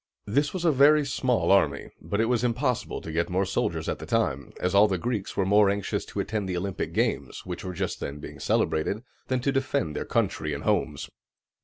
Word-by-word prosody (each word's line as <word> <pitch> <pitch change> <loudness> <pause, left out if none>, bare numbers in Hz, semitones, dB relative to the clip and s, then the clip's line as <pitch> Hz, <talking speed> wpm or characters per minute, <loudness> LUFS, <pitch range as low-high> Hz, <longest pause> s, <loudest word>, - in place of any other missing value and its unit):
This 140 +8 +1
was 180 -2 -3
a 165 - +5
very 145 +2 +5
small 130 -5 +1
army; 75 -8 +2
but 100 - -2
it 115 - +3
was 120 0 +1
impossible 125 +1 -1
to 80 - -7
get 85 +2 0
more 95 +2 +1
soldiers 95 - -1
at - - -2
the - - -8
time, 70 +1 0
as 90 +1 0
all 100 +2 +7
the 95 -2 0
Greeks 105 +2 -3
were 95 - +2
more 100 +1 +5
anxious 100 -1 -1
to - - -6
attend 105 -4 -2
the 90 - -1
Olympic 95 +1 -3
games, - - -1
which - - -5
were 90 -1 -5
just 95 0 -2
then 70 - -5
being 75 - -9
celebrated, 100 +8 0 0.2
than 130 -1 0
to 140 - +1
defend 135 - -1
their - - -3
country - - 0
and - - -6
homes. - - 0
100 Hz, 215 wpm, -27 LUFS, 90-125 Hz, 0.2 s, all